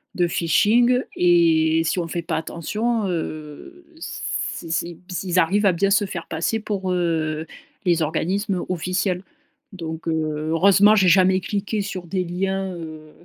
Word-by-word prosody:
de 175 Hz, -1 st, +2 dB
phishing 230 Hz, +10 st, +3 dB
et 165 Hz, -2 st, +3 dB
si 165 Hz, +2 st, 0 dB
on 170 Hz, -, -2 dB
fait 170 Hz, +1 st, -3 dB
pas 165 Hz, 0 st, -2 dB
attention, 215 Hz, +8 st, -2 dB
heu, 165 Hz, -, -6 dB
c 170 Hz, -, -4 dB
c 170 Hz, +1 st, -1 dB
b -, -, -21 dB, 0.2 s
ils 185 Hz, -1 st, +1 dB
arrivent 200 Hz, +5 st, +2 dB
à -, -, +5 dB
bien 195 Hz, +4 st, +1 dB
se 205 Hz, 0 st, +3 dB
faire 170 Hz, -3 st, -6 dB
passer 170 Hz, +8 st, -1 dB
pour, 195 Hz, -3 st, -3 dB
heu, 160 Hz, -3 st, -1 dB, 0.4 s
les 170 Hz, -2 st, +2 dB
organismes 180 Hz, +5 st, -1 dB
officiels. 180 Hz, +1 st, -1 dB, 0.5 s
Donc, 165 Hz, -4 st, -7 dB
heu, -, -, +1 dB, 0.4 s
heureusement, 200 Hz, +5 st, +5 dB
j'ai 190 Hz, -3 st, +4 dB
jamais 185 Hz, +1 st, +5 dB
cliqué 205 Hz, +2 st, -2 dB
sur 190 Hz, -3 st, -6 dB
des 185 Hz, +2 st, -1 dB
liens, 190 Hz, +2 st, -2 dB
heu 155 Hz, -2 st, -9 dB
180 Hz, 155 wpm, -22 LUFS, 165-200 Hz, 0.5 s, à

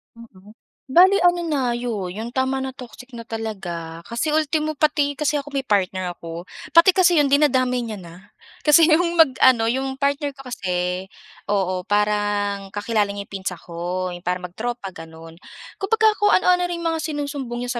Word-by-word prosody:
Mm. 210 Hz, -3 st, -16 dB, 0.4 s
Bale 375 Hz, +3 st, +7 dB
ano 350 Hz, 0 st, +4 dB
na 270 Hz, -5 st, 0 dB
'yon, 230 Hz, -7 st, -3 dB
yung 220 Hz, +4 st, -6 dB
tama 260 Hz, 0 st, 0 dB
na, 265 Hz, 0 st, -5 dB
toxic 250 Hz, 0 st, -12 dB
na 230 Hz, -, -7 dB
talaga 175 Hz, -8 st, -6 dB
kasi 270 Hz, -, -2 dB
ultimo 310 Hz, 0 st, 0 dB
pati 290 Hz, -1 st, +1 dB
kasi 295 Hz, 0 st, 0 dB
ako 285 Hz, 0 st, -9 dB
may 270 Hz, -, 0 dB
partner 185 Hz, -5 st, 0 dB
ako, 170 Hz, 0 st, -8 dB, 0.3 s
pati 335 Hz, +3 st, +8 dB
kasi 360 Hz, -2 st, +4 dB
'yon 290 Hz, -3 st, +3 dB
dinadamay 255 Hz, -4 st, +3 dB
niya 225 Hz, -2 st, -5 dB
na. 170 Hz, -2 st, -12 dB, 0.5 s
Kasi 300 Hz, +3 st, +7 dB
yung 340 Hz, +2 st, +3 dB
mag-ano, 260 Hz, -7 st, +4 dB
yung 265 Hz, +1 st, -2 dB
partner 280 Hz, 0 st, -1 dB
ko 270 Hz, -, -12 dB
kasi 180 Hz, -2 st, -2 dB, 0.4 s
oo, 185 Hz, -3 st, -1 dB
parang 205 Hz, -1 st, 0 dB
kakilala 205 Hz, 0 st, 0 dB
niya 200 Hz, -, -5 dB
yung -, -, -26 dB
pinsan 190 Hz, -2 st, -4 dB
ko. 180 Hz, +2 st, -4 dB
Yung 175 Hz, -, -7 dB
parang 180 Hz, 0 st, -3 dB
mag-tropa, 230 Hz, 0 st, -5 dB
gano'n. 165 Hz, 0 st, -12 dB, 0.4 s
Kumbaga 440 Hz, +2 st, +3 dB
kung 415 Hz, -, +3 dB
ano-ano 360 Hz, -1 st, +3 dB
ring 340 Hz, -1 st, -5 dB
mga 325 Hz, -1 st, 0 dB
sinusumbong 285 Hz, -5 st, -4 dB
niya 245 Hz, -1 st, -3 dB
240 Hz, 170 wpm, -22 LUFS, 190-295 Hz, 0.5 s, pati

